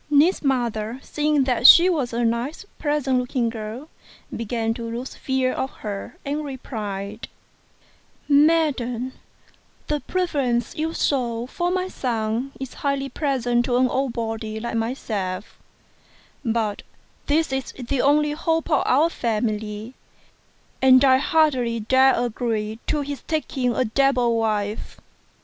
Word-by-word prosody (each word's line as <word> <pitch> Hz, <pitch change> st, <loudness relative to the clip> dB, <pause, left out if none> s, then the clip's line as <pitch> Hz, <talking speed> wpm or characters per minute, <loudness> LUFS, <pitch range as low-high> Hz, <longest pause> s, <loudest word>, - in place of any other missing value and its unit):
Ning's 295 Hz, +6 st, +4 dB
mother, 240 Hz, -4 st, -1 dB
seeing 300 Hz, -2 st, +1 dB
that 250 Hz, -1 st, +4 dB
she 345 Hz, +2 st, +10 dB
was 295 Hz, -9 st, 0 dB
a 235 Hz, 0 st, 0 dB
nice 235 Hz, -, -2 dB
pleasant 290 Hz, -4 st, +1 dB
looking 245 Hz, -1 st, -1 dB
girl, 225 Hz, +5 st, -6 dB, 0.5 s
began 225 Hz, 0 st, -1 dB
to 230 Hz, 0 st, -6 dB
lose 240 Hz, +3 st, -5 dB
fear 265 Hz, -1 st, -1 dB
of 265 Hz, -, -2 dB, 0.2 s
her, 200 Hz, -2 st, -5 dB
and 290 Hz, +2 st, -2 dB
replied, 215 Hz, -6 st, -6 dB, 0.6 s
" -, -, -35 dB, 0.2 s
Madam, 260 Hz, -6 st, 0 dB, 0.7 s
the 300 Hz, -1 st, -1 dB
preference 280 Hz, -11 st, -1 dB
you 320 Hz, +1 st, -1 dB
shew 240 Hz, -4 st, 0 dB
for 345 Hz, +7 st, -2 dB
my 370 Hz, 0 st, -1 dB
son 235 Hz, -3 st, -2 dB
is 265 Hz, -1 st, -6 dB
highly 275 Hz, -1 st, -2 dB
pleasing 250 Hz, -4 st, 0 dB
to 245 Hz, 0 st, 0 dB
an 255 Hz, 0 st, +4 dB
old 265 Hz, -1 st, -1 dB
body 225 Hz, -1 st, -4 dB
like 235 Hz, +2 st, -4 dB
myself; 215 Hz, -5 st, -3 dB, 0.8 s
but 225 Hz, -4 st, -1 dB, 0.5 s
this 305 Hz, -1 st, +1 dB
is 265 Hz, -1 st, -2 dB
the 255 Hz, +1 st, -2 dB
only 295 Hz, +1 st, +3 dB
hope 325 Hz, +2 st, -1 dB
of 295 Hz, -, +4 dB
our 290 Hz, +6 st, +4 dB
family, 215 Hz, -4 st, -2 dB, 0.9 s
and 260 Hz, +1 st, +7 dB
I 260 Hz, -1 st, +6 dB
hardly 265 Hz, -6 st, +2 dB
dare 260 Hz, +4 st, +4 dB
agree 225 Hz, -2 st, -2 dB
to 300 Hz, -, +1 dB
his 285 Hz, -1 st, -5 dB
taking 265 Hz, -6 st, -1 dB
a 255 Hz, -, +1 dB
devil 250 Hz, 0 st, +2 dB
wife." 215 Hz, -2 st, -2 dB
250 Hz, 135 wpm, -23 LUFS, 230-280 Hz, 0.9 s, she